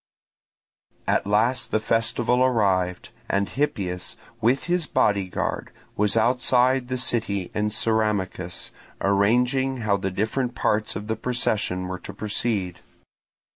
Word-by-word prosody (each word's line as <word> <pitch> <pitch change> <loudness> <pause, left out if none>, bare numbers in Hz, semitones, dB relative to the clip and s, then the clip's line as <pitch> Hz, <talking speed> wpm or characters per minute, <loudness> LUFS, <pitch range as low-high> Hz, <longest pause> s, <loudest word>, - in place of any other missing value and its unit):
At - - +1
last 115 +5 +2
the 110 - +1
festival 115 +3 +1
arrived; 95 -7 +1 0.2
and 100 0 +1
Hippias 95 -11 -2 0.3
with 120 +4 +2
his 175 -3 0
bodyguard 100 -3 0 0.3
was 105 +2 +2
outside 125 +2 +3
the 130 0 -2
city 110 -7 0
in 105 - 0
the - - +1
Ceramicus, 105 -5 -1 0.3
arranging 125 +6 +2
how 100 -2 +3
the 95 0 -2
different 110 +6 -1
parts 105 -1 0
of 105 - -5
the 110 +1 -1
procession 105 -6 -1
were 95 0 -5
to 100 - -9
proceed. 100 -4 -2
110 Hz, 125 wpm, -24 LUFS, 100-125 Hz, 0.3 s, outside